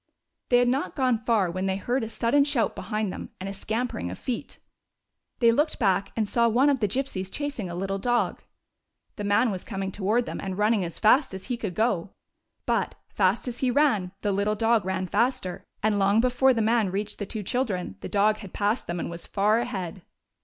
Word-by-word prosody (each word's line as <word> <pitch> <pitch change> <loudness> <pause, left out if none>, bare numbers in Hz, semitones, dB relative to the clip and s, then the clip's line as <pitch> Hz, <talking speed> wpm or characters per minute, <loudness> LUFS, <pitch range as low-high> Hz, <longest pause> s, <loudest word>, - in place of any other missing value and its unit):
They 245 - +5
had 245 0 +4
not 265 +4 0
gone 250 -4 +1
far 210 -7 +2
when 185 +2 -2
they 190 - +1
heard 240 +6 -1
a 220 - -4
sudden 235 +5 +2
shout 275 -7 0
behind 215 -2 -2
them - - -7
and 190 - -5
a 195 - -4
scampering 220 - -3
of 90 - -6
feet. 245 -3 -5 0.8
They 235 -1 +5
looked 295 +6 +1
back, 195 -5 +1
and 220 -2 0
saw 235 +2 +3
one 260 +6 +4
of 270 - 0
the 210 - +2
Gypsies 200 -5 -3
chasing 280 -10 -3
a 170 - -5
little 195 +2 -2
dog. 240 +3 0 0.8
The 210 - -4
man 210 +4 +3
was 185 -2 -5
coming 195 -3 -4
toward 215 +5 +1
them, - - -5
and 190 -1 -4
running 210 -1 +2
as 170 -2 -5
fast 235 0 +4
as 190 - -6
he - - +1
could 210 -7 -5
go. 205 -5 +1 0.6
But, - - 0
fast 195 +5 +1
as 245 -1 -3
he 260 - +1
ran, 240 -9 +2
the 205 - 0
lit 200 +1 0
tle 210 - +1
dog 225 -2 +2
ran 190 0 -1
faster; 190 -4 -1 0.2
and 210 -1 +2
long 200 +2 +4
before 255 +2 +4
the 225 - +1
man 225 -2 +2
reached 205 +3 -3
the 205 - -4
two 215 0 -5
children 190 - -2
the - - -7
dog 210 +1 +3
had 200 -4 -10
passed 210 +4 0
them 175 0 -3
and - - -3
was 170 0 -7
far 210 +3 +2
ahead. 190 -7 -4
215 Hz, 215 wpm, -26 LUFS, 190-240 Hz, 0.8 s, They